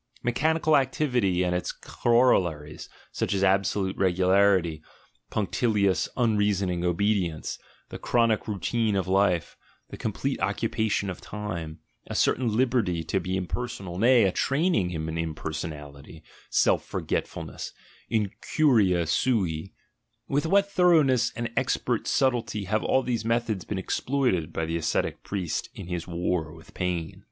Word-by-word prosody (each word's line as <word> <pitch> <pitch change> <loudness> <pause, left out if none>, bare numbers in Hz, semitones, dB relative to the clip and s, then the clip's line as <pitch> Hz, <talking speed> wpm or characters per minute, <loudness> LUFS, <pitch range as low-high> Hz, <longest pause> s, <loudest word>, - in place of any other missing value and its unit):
Mechanical 155 +5 +2
activity 125 -9 +1
and 90 0 0
its 90 - -2
corollaries, 90 -11 +1 0.2
such - - -1
as 95 - 0
absolute 95 0 +1
regularity, 95 -3 +3 0.5
punctilious 105 -2 +1
unreasoning 105 -6 +1
obedience, 90 -2 0 0.3
the - - -7
chronic 115 -3 +1
routine 110 +1 0
of 95 -1 -1
life, 95 -3 +1 0.4
the - - -7
complete - - -2
occupation 110 -3 0
of 90 - -9
time, 85 -7 -6 0.3
a - - -5
certain 115 -4 +1
liberty 120 -10 +1
to 90 +5 -1
be 95 0 -2
impersonal, 95 -2 -4
nay, 120 +2 +5
a 95 - +3
training 135 - +1
in 80 -1 -3
"impersonality," 80 -2 -6 0.3
self - - +3
forgetfulness, - - -4 0.4
"incuria 105 - +2
sai" 95 -5 0 0.3
— - - -50
with 145 +3 +1
what 200 +3 +4
thoroughness 150 -11 +4
and 120 -1 -3
expert - - 0
subtlety 115 -5 +1
have 105 +3 -1
all 130 - +2
these 120 -2 -1
methods 115 -4 -1
been 105 - -3
exploited 95 - 0
by 80 - -2
the 80 +1 -2
ascetic 80 - -1
priest 95 -5 -3
in - - -7
his 90 -1 -4
war 85 -2 -1
with 80 -1 -16
pain! 90 -3 -3
100 Hz, 130 wpm, -26 LUFS, 85-120 Hz, 0.5 s, nay